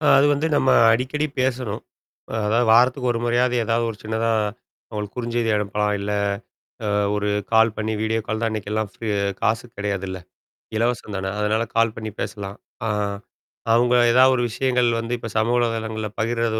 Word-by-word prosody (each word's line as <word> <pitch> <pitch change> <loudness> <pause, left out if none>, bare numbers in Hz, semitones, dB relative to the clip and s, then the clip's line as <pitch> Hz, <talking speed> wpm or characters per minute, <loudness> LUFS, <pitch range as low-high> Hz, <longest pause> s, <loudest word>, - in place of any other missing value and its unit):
அ 155 - -4
அது 140 - +5
வந்து 150 +3 -1
நம்ம 130 - +2 0.2
அடிக்கடி 130 +6 0
பேசணும். 125 -5 -1 0.6
அதாவது 115 +3 +2
வாரத்துக்கு 125 +2 +4
1 115 - -2
முறையாவது 120 +1 +2
ஏதாவது 115 +1 +1
ஒரு 110 - -8
சின்னதா, 110 +1 -1 0.6
அவங்களுக்கு 105 0 -5
குறுஞ்செய்தி 120 -1 -1
அனுப்பலாம். 105 0 0
இல்ல, 100 +1 -3 0.8
அ - - 0 0.3
ஒரு 105 0 -1 0.2
கால் 110 -1 +5
பண்ணி, 110 0 -2
வீடியோ 110 +1 0
கால் 110 0 -1
தான் 115 - +1
இன்னைக்கெல்லாம் 110 0 -2
ஃப்ரீ 115 - -6 0.3
காசுக்கு 115 +1 -1
கிடையாதுல்ல. 95 -2 -3 0.6
இலவசம் 115 -2 -1
தானே. 95 0 -2
அதனால 105 +2 +1
கால் 115 -1 +2
பண்ணி 110 -1 -5
பேசலாம். 100 -1 -5 0.3
ஆ. - - 0 0.8
அவங்க 120 +1 +4 0.2
ஏதாவது 130 +2 +6
ஒரு 120 - 0
விஷயங்கள் 125 +1 +1
வந்து 115 +1 -3
இப்ப 115 - -7
சமூக 115 +3 +2
வலைதளங்கள்ல 110 -2 -1
பகிர்து 115 0 0
115 Hz, 160 wpm, -22 LUFS, 110-120 Hz, 0.8 s, ஏதாவது